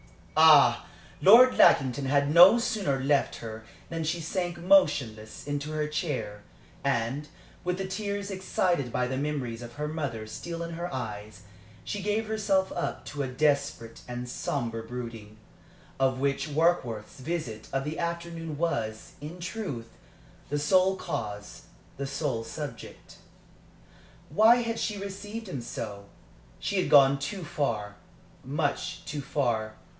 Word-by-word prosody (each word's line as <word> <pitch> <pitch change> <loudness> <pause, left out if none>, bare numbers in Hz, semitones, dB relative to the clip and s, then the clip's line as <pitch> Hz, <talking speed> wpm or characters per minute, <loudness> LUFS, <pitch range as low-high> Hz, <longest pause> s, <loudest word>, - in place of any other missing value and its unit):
Ah! - - +7 0.3
Lord 240 +6 +8
Lackington 135 0 +5
had 140 +2 +2
no 180 +7 +9
sooner 200 - 0
left 140 +2 +1
her 110 -1 -8 0.3
than 165 -1 -3
she 165 +2 -1
sank 175 +1 -3
motionless 150 - +2
into 145 +1 -3
her 155 -1 -1
chair, 130 - -3 0.4
and, 135 +2 -1 0.4
with 180 0 -1
the 195 - -3
tears 200 +1 -3
excited 180 -7 0
by 125 - 0
the 130 +1 -2
memories 135 -5 -3
of 120 -1 -9
her 150 +2 -3
mother 140 -8 -4
still 170 +9 -6
in 170 - -5
her 175 +2 -4
eyes, 105 -5 -6 0.4
she 205 - -4
gave 210 +3 0
herself 200 -3 +1
up 175 - -3
to 145 - -5
a 135 - -1
desperate 140 -3 0
and 125 0 -5
sombre 120 -2 -3
brooding, 115 -3 -8 0.6
of 130 -1 +2
which 140 +3 0
Warkworth's 140 -9 0
visit 130 -7 -4
of 135 0 -1
the 150 +3 -4
afternoon 170 -2 -4
was, 115 -10 -2
in 160 +5 -8
truth, 175 - -5 0.6
the 145 - 0
sole 185 +6 +3
cause, 105 - -5 0.3
the 140 0 -3
sole 140 -4 -2
subject. 130 -1 -8 1.1
Why 220 +10 +6
had 230 0 -2
she 210 -2 -2
received 200 +3 -6
him 140 -9 -4
so? 105 -3 -6 0.5
She 200 - -2
had - - -2
gone 140 -1 +7
too 180 +7 -4
far 110 -10 -2 0.5
much 145 +2 -2
too 145 -1 -4
far. 120 -6 -1
145 Hz, 140 wpm, -28 LUFS, 120-175 Hz, 1.1 s, no